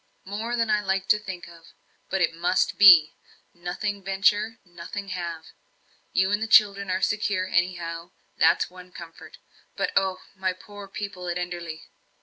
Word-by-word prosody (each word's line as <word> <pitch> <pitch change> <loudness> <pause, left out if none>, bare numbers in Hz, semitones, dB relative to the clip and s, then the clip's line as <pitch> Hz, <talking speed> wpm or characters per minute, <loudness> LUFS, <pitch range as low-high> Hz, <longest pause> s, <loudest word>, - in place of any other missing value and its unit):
"More 220 +5 -3
than 230 -2 0
I 210 0 +2
like 190 -1 -1
to 210 - +5
think 190 -4 -8
of. 170 -1 -16 0.4
But 190 0 -1
it 170 - +2
must 175 +3 0
be; 175 -7 +8 0.4
nothing 195 +4 -4
venture 205 +3 +1
nothing 175 +3 -8
have. 170 -3 -5 0.7
You 190 +1 +2
and 205 +1 +1
the 225 - -1
children 200 -3 +4
are 185 +1 -1
secure 205 -3 0
anyhow, 175 -2 -2 0.3
that's - - +3
one 180 0 -14
comfort. 170 -2 -12 0.4
But - - -1
oh, 190 -1 +1
my 190 -1 -1
poor 205 +2 -12
people 195 -2 -6
at 175 0 -2
Enderley!" 175 -2 -5
185 Hz, 155 wpm, -25 LUFS, 175-205 Hz, 0.7 s, be